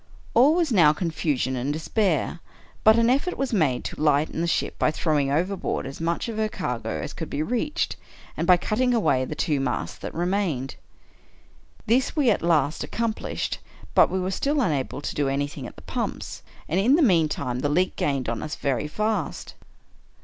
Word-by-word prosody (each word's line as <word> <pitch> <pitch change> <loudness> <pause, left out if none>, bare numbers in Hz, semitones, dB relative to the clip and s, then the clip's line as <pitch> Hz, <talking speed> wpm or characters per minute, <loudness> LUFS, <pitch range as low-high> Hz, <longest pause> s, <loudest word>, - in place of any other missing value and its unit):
All 270 +7 +6
was 340 -5 +1
now 165 -8 +6
confusion 150 -6 -1
and 130 +3 -1
despair 165 +1 0 0.2
— - - -28
but 220 +1 +7
an 230 0 +4
effort 280 +9 +1
was 270 -3 -2
made 150 - +2
to - - -6
lighten 150 +1 +2
the 170 - 0
ship - - -1
by - - +3
throwing 150 -3 0
overboard 180 +4 -1
as 135 +3 -7
much 170 +5 -1
of 225 -2 -5
her 215 0 +1
cargo 120 - -3
as 75 - -5
could - - -6
be 145 +2 -1
reached, 250 - -1 0.4
and 170 - -2
by 180 -1 +7
cutting 245 +7 +1
away 145 - +2
the 150 - -5
two 150 -3 0
masts 135 - -2
that - - -7
remained. 175 -7 -1 1.1
This 250 +8 +2
we 280 -7 +4
at - - 0
last 160 -3 +1
accomplished 230 -2 -3 0.2
— - - -19
but - - +6
we 190 - -1
were 185 +1 -1
still 285 +9 0
unable 145 - -1
to - - -3
do 145 -2 +1
anything 140 -1 -3
at - - -12
the - - -14
pumps: - - -4 0.3
and, 175 - +1
in 245 +8 +5
the 330 - +4
meantime, 155 - +2
the 145 - 0
leak 180 +5 +1
gained 135 -3 -1
on 115 0 -2
us 155 - -4
very 135 0 -1
fast. 210 +1 -2
165 Hz, 195 wpm, -25 LUFS, 145-220 Hz, 1.1 s, but